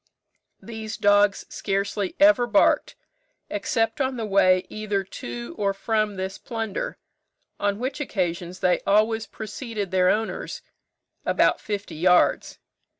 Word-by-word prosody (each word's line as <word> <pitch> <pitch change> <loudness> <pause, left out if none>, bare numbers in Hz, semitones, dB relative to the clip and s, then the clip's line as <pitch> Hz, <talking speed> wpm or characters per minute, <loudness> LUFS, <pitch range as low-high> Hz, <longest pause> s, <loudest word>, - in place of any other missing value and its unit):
These 220 -1 -6
dogs 205 -1 +3
scarcely 200 0 -2
ever 295 -5 +6
barked, 205 -3 +3 0.6
except 225 +4 0
on 260 -1 -1
the 225 - -3
way 185 -2 +4
either 210 -2 -2
to 120 -10 -7
or 200 -1 +1
from 215 0 0
this 190 0 -5
plunder; 225 - -4 0.6
on 200 0 0
which 255 +6 -3
occasions 180 -8 -3
they 180 -2 +3
always 220 +2 +2
preceded 215 -2 -6
their 185 -1 +3
owners 220 +3 -2 0.6
about - - +2
fifty 205 -2 -4
yards. 180 +3 +3
205 Hz, 120 wpm, -24 LUFS, 190-225 Hz, 0.6 s, ever